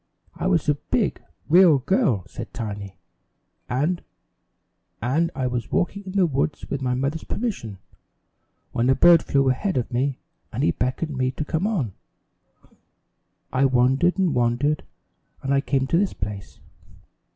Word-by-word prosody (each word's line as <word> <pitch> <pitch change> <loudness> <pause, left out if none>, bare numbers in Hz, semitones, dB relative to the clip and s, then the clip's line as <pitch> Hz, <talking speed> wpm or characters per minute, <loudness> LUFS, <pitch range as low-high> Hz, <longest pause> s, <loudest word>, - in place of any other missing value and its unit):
"I - - -3
was 175 -5 +2
a 150 - +5
big, 140 - -1 0.3
real 170 -2 +7
girl," 135 - +1
said - - -9
Tiny, 100 -5 -5 0.7
"and 150 +8 0 1.0
and 150 +9 +1
I 130 - -1
was 120 -3 -3
walking 200 +3 -1
in 185 - -7
the 195 -2 +4
woods, 145 -1 -1
with 140 - -2
my 125 -1 0
mother's 140 +5 -2
permission, 185 - -4 0.9
when 120 +2 +1
a 130 - +5
bird 170 +1 +7
flew 135 -1 +1
ahead 185 +8 0
of 125 -1 -2
me 130 +2 0 0.3
and - - -2
he 85 - +4
beckoned 130 - -2
me 130 0 +1
to 150 - -4
come 160 +6 0
on. 150 - -1 1.6
I 135 +2 +3
wandered 135 +8 +3
and 185 -5 +2
wandered 125 +5 +1 0.6
and 135 +1 0
I 135 - +3
came 135 -1 0
to 165 +5 +2
this 200 -1 0
place. 100 +1 -6
135 Hz, 150 wpm, -24 LUFS, 125-170 Hz, 1.6 s, real